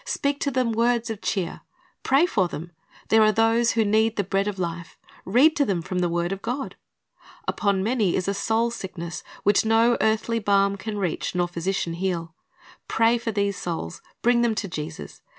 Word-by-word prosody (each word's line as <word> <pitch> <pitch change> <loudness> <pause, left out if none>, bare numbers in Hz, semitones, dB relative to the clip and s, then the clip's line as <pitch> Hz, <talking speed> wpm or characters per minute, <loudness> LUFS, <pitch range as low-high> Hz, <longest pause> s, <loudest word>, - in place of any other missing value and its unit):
Speak 280 - -1
to 285 - 0
them 255 -3 0
words 235 0 +1
of 215 - -6
cheer. 185 -5 -2 0.4
Pray 275 +5 +4
for 195 - +1
them. 170 +1 -7 0.4
There 220 0 +5
are 215 0 +5
those 225 +2 +3
who 225 -1 +2
need 220 +2 +2
the 200 - 0
bread 195 +1 0
of 205 -2 -3
life. 170 -2 -5 0.3
Read 265 +11 +4
to 290 - +4
them 190 -9 -1
from 180 +2 -3
the 175 -1 +1
word 170 +1 -1
of 195 0 -4
God. 250 +5 -4 0.7
Upon 200 -2 +1
many 220 -4 +1
is 185 - -1
a 200 - +1
soul 225 +3 0
sickness 180 -6 -6 0.2
which 205 0 +4
no 225 +2 +3
earthly 220 +1 +1
balm 200 -1 +2
can 210 +2 -5
reach 185 -2 -2
nor 175 -1 +1
physician 175 0 -2
heal. 170 -2 -3 0.5
Pray 230 +1 +3
for 230 0 -3
these 200 -2 -1
souls, 165 - -5 0.2
bring 240 0 +4
them 235 -2 +1
to 215 - -2
Jesus. 160 -1 -7
205 Hz, 190 wpm, -24 LUFS, 180-230 Hz, 0.7 s, There